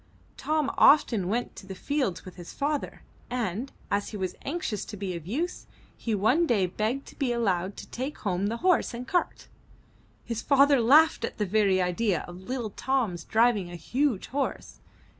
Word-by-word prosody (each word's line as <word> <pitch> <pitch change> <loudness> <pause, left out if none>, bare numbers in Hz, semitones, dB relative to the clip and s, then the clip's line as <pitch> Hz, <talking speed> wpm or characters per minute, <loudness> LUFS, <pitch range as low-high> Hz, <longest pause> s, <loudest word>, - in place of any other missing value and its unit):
Tom 305 -2 0
often 235 -10 +5
went 235 +5 -2
to 190 - -11
the 190 - -6
fields 265 - -2
with 185 - -10
his 175 -2 -9
father, 290 0 -3 0.3
and, 245 +1 -2 0.2
as 200 0 0
he 210 - -6
was 185 -2 -2
anxious 285 - -3
to 210 - -8
be 190 -2 -3
of 165 -1 -8
use, 320 - -3 0.3
he 225 -2 -2
one 250 - +3
day 205 -8 +3
begged 220 +9 -2
to - - -13
be 265 -4 +1
allowed 195 -5 0
to - - -8
take 265 +5 -5
home 195 0 -1
the 230 +2 -2
horse 360 -9 +3
and 245 +2 -7
cart. 355 +3 -1 0.8
His 230 -1 -3
father 280 -1 +5
laughed 295 +4 +5
at - - -3
the 210 - 0
very 200 -1 +2
idea 180 +1 0
of 175 0 -9
little 235 +1 -4
Tom's 230 -9 -1
driving 220 -5 +2
a 175 - -7
huge 240 - 0
horse. 275 +1 -3
225 Hz, 180 wpm, -27 LUFS, 190-270 Hz, 0.8 s, often